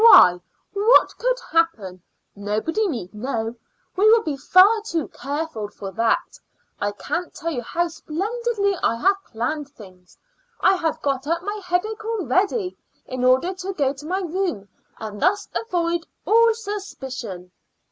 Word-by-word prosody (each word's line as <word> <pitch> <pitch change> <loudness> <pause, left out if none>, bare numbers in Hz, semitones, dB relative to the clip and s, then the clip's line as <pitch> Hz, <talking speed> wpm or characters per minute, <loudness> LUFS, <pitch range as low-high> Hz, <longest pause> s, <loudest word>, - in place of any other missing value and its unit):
"Why, 180 - +9 0.3
what 415 +4 +5
could - - +1
happen? 220 - 0 0.3
Nobody 215 - -1
need 230 - -4
know; 225 0 -3 0.4
we 410 +3 +5
will 450 0 +6
be 300 -3 -2
far 375 +10 +5
too 335 -8 -2
careful 285 -6 -4
for 200 -1 -8
that. 225 +2 0 0.4
I 205 - 0
can't 350 - -3
tell 335 0 -3
you 250 -6 -2
how 345 +9 -1
splendidly 400 +6 -2
I 230 - +2
have 390 +10 +2
planned 280 +6 -3
things. 185 -8 -16 0.4
I - - +5
have 320 -3 -2
got 275 -1 -1
up 335 +2 0
my 410 +1 -4
headache 400 +6 -1
already, 395 - 0 0.3
in 255 -1 -4
order 260 +9 +3
to 375 +1 -5
go 280 -6 +1
to 285 +1 -11
my 375 +3 -1
room 345 - -2 0.3
and 210 -2 -7
thus 405 +2 +2
avoid 345 -6 -1 0.2
all 460 +1 +5
suspicion." 265 - -6
330 Hz, 145 wpm, -23 LUFS, 240-395 Hz, 0.4 s, Why